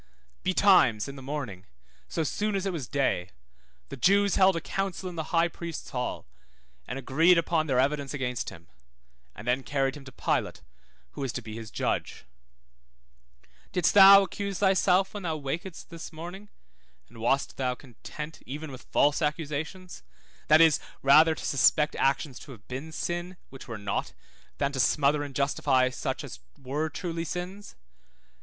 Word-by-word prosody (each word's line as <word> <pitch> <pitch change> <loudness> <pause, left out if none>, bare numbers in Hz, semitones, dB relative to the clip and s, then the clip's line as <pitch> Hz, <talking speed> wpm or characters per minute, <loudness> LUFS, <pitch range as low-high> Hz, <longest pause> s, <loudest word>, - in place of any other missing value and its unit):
Betimes, 180 - +4
in 140 - -7
the 135 - -9
morning, 130 -9 -6 0.4
so 165 - -2
soon 210 +7 -1
as 195 0 -1
it 195 - -1
was 145 -8 -4
day, 130 -11 0 0.6
the - - -6
Jews 200 +9 +3
held 190 -1 +5
a - - 0
council 195 +2 -3
in 180 - -6
the 160 -2 -3
high 170 0 +3
priest's 170 -1 -7
hall, 125 -1 -3 0.6
and 125 - -4
agreed 160 +7 +4
upon 165 -1 +1
their 130 -3 +1
evidence 140 0 0
against 125 -4 -3
him, 85 0 -14 0.7
and 105 - -10
then 125 +2 +2
carried 135 -1 -1
him 145 - -10
to 130 - -10
Pilate, - - -2 0.5
who - - -8
was 135 -3 -2
to 125 - -5
be 110 -1 -8
his 110 -1 -7
judge; - - -3 1.5
didst 180 -2 +2
thou 195 0 +10
accuse 200 0 -4
thyself 190 -1 +3
when 205 - -5
thou 165 -4 -2
wakedst 160 +5 -5
this 165 -1 -8
morning, 175 +6 -9 0.6
and 115 - -15
wast 130 +5 0
thou 130 -2 -1
content 150 +5 -9
even 145 +3 -7
with 130 - -11
false 145 +3 +3
accusations, 155 +4 -3 0.5
that 155 +1 +7
is, 160 -3 +5 0.2
rather 155 +4 +6
to - - -7
suspect 150 +2 +3
actions 135 0 0
to 145 - -12
have 105 -3 -17
been 135 +5 -6
sin, 175 +3 -4
which 135 - -11
were 115 - -5
not, 100 -1 -3 0.4
than 140 0 0
to 135 - -4
smother 145 +2 +3
and 145 -2 -6
justify 130 -2 +2
such - - -4
as 65 - -9 0.2
were 145 +4 -3
truly 165 +1 -4
sins? 180 +4 -6
150 Hz, 165 wpm, -28 LUFS, 135-175 Hz, 1.5 s, thou